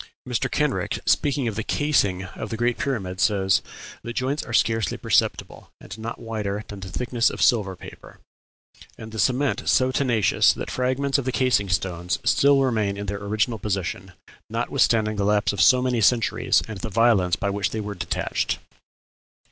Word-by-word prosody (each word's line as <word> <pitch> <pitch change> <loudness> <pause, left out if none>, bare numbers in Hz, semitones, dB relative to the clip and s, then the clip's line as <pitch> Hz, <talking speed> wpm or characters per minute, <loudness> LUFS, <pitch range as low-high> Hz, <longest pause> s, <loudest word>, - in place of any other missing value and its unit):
Mr. - - -1
Kenrick, - - -1
speaking 140 -3 +1
of 115 - -2
the 110 - -2
casing 100 -9 +1
of 100 +3 -7
the 115 - -4
Great 120 +1 0
Pyramid, 100 -11 -3
says, 95 -2 +2 0.4
"The 120 - -6
joints 135 +5 -1
are - - -9
scarcely 115 -1 +1
perceptible, - - -1
and - - -10
not 115 +1 -5
wider 105 -2 -4
than 100 - -9
the 95 0 -8
thickness 120 +2 0
of - - -8
silver 100 -6 +2
paper, - - -13 0.8
and 110 0 -9
the 110 - -6
cement 130 +3 +1
so 130 0 +3
tenacious 125 -6 +3
that - - -6
fragments 130 +2 0
of 135 - -4
the 130 - 0
casing 125 -6 +1
stones 90 -1 -1
still 140 0 +4
remain 110 -6 0
in 100 - -5
their 100 0 -4
original 110 +3 -1
position, 95 -2 -3 0.4
notwithstanding 110 -2 +1
the 100 - 0
lapse 105 0 +2
of 100 - -1
so 125 -1 +5
many 125 -2 0
centuries, 115 +2 +2
and 110 -3 -7
the 95 - -5
violence 105 -5 +3
by 100 +1 -2
which 100 0 -1
they 110 - -4
were 105 -1 -4
detached." 90 - -2
110 Hz, 175 wpm, -23 LUFS, 100-125 Hz, 0.8 s, so